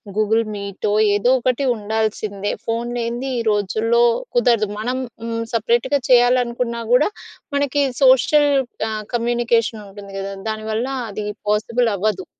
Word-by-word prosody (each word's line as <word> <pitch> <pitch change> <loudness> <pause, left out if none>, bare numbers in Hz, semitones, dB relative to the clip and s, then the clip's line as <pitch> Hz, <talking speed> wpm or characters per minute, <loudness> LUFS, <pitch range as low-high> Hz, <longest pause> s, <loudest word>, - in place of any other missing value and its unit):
Google 215 +2 +2
మీ‌టో, 200 +1 -3 0.2
ఏదో 245 +5 +3
ఒకటి 255 +3 0
ఉండాల్సిందే! 215 -1 -2
ఫోన్ 230 +1 -2
లేనిది 240 +3 -3
ఈ - - -2
రోజుల్లో 220 +3 +1 0.4
కుదరదు. 230 -3 +3
మనం 250 +4 -2 0.2
హ్మ్. 230 0 -3
సపరేట్‌గా 235 +5 +1
చేయాలనుకున్నా 245 -1 +3
కూడా, 265 +10 +4 0.5
మనకి 285 0 +1 0.2
సోషల్ 280 +3 +5 0.4
ఆహ్, 215 -1 -4
కమ్యూనికేషన్ 235 -2 0
ఉంటుంది 200 0 -11
కదా! 195 0 -5 0.2
దానివల్ల 220 +2 -2 0.3
అది 210 +1 -5 0.2
పాసిబుల్ 230 +3 +1
అవ్వదు. 195 -1 -1
230 Hz, 120 wpm, -20 LUFS, 215-245 Hz, 0.5 s, సోషల్